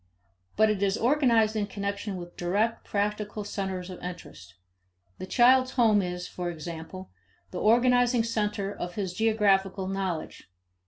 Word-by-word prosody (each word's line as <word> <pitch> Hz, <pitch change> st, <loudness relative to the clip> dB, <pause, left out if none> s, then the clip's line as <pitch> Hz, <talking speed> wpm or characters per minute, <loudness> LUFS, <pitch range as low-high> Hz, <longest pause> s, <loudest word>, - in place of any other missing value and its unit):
But 215 Hz, 0 st, +4 dB
it 205 Hz, -2 st, -2 dB
is 200 Hz, +1 st, +1 dB
organized 235 Hz, -4 st, +3 dB
in 210 Hz, -2 st, -1 dB
connection 200 Hz, 0 st, -4 dB
with 175 Hz, -1 st, -9 dB
direct 205 Hz, +6 st, -1 dB
practical 210 Hz, +1 st, -2 dB
centers 190 Hz, -2 st, -4 dB
of 180 Hz, -, -9 dB
interest. 170 Hz, -, -9 dB, 0.6 s
The 185 Hz, -, -6 dB
child's 255 Hz, +4 st, +4 dB
home 220 Hz, -5 st, +4 dB
is, 180 Hz, -1 st, -4 dB
for 175 Hz, -1 st, -4 dB
example, 170 Hz, +3 st, -8 dB, 0.4 s
the 180 Hz, -, -4 dB
organizing 245 Hz, +1 st, +4 dB
center 210 Hz, -3 st, -2 dB
of 175 Hz, -2 st, -6 dB
his 190 Hz, -4 st, -3 dB
geographical 195 Hz, -3 st, +1 dB
knowledge. 190 Hz, -, -4 dB
200 Hz, 140 wpm, -27 LUFS, 185-220 Hz, 0.6 s, But